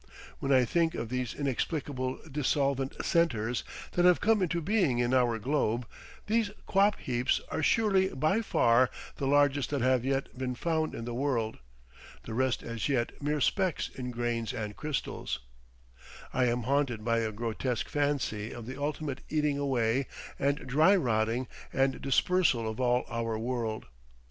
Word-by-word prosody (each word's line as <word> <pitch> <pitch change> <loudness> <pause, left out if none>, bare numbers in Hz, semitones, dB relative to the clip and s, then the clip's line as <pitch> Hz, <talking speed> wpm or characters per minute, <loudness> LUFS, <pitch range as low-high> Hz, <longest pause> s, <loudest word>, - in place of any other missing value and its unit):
When 140 - -1
I 130 -2 +5
think 165 +5 +1
of 115 - -4
these 125 -1 -2
inexplicable 135 -1 -2
dissolvent 140 -2 0
centres 120 - +1 0.3
that 175 - +1
have 180 -1 +6
come 220 -1 +3
into 170 -1 +1
being 175 - +1
in 120 +1 +1
our 120 -3 +3
globe—these 140 - -1 0.2
quap 200 +1 +3
heaps 125 0 0
are - - -1
surely 195 +1 +3
by 155 - +1
far 120 - +3 0.3
the 135 - -1
largest 145 -1 +3
that 140 -3 -1
have 130 -1 +3
yet 135 +1 -1
been 125 -1 -3
found 160 +2 -1
in 115 - -5
the 120 - -4
world; 120 -4 -1 0.6
the 115 - -6
rest 130 +1 0
as 115 +3 -3
yet 125 -2 -1
mere 150 +1 0
specks 185 +4 +1
in 125 -1 -6
grains 120 -2 -2
and 105 -3 -4
crystals—I - - -5
am 120 0 0
haunted 130 -4 0
by 115 -1 +2
a 110 -1 -1
grotesque 115 +2 -2
fancy 140 -7 -1
of 120 - -8
the 130 +3 -7
ultimate 145 -2 -3
eating 150 -2 +1
away 130 -2 +1 0.3
and 140 +1 0
dry 155 +10 +5
rotting 120 - +1 0.2
and 135 0 +1
dispersal 135 -3 +2
of 110 +1 -4
all 125 -1 +2
our 115 -1 -2
world. 115 -1 -2
130 Hz, 155 wpm, -30 LUFS, 115-145 Hz, 0.6 s, have